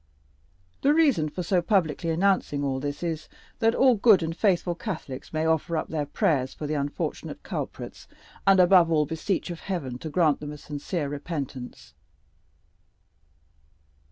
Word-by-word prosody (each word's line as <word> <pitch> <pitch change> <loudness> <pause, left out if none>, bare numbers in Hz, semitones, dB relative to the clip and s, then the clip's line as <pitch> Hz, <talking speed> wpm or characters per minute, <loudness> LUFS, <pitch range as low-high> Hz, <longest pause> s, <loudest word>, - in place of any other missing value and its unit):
The 290 +2 +4
reason 270 - +3
for 180 +4 -5
so 180 +1 +2
publicly 170 -3 +1
announcing 165 -4 +1
all 135 -1 -1
this 145 +4 -4
is, 160 -2 -3 0.3
that 225 -1 +3
all 260 -1 +5
good 205 -4 +5
and 165 0 -3
faithful 180 -3 +1
Catholics 155 -6 -6
may 155 0 -1
offer 160 +1 +1
up - - -3
their 150 -3 -2
prayers 135 -3 0
for 150 - -6
the 150 - -2
unfortunate 145 -1 -3
culprits, - - -6 0.4
and, 195 -1 +6
above 180 -2 +6
all, 155 -2 +3
beseech 165 +4 -2
of 170 - -6
Heaven 140 -11 -4
to 160 - -6
grant 155 -2 +2
them 150 0 -6
a - - -8
sincere 150 +2 -4
repentance." 140 -3 -6
160 Hz, 155 wpm, -26 LUFS, 145-185 Hz, 0.4 s, and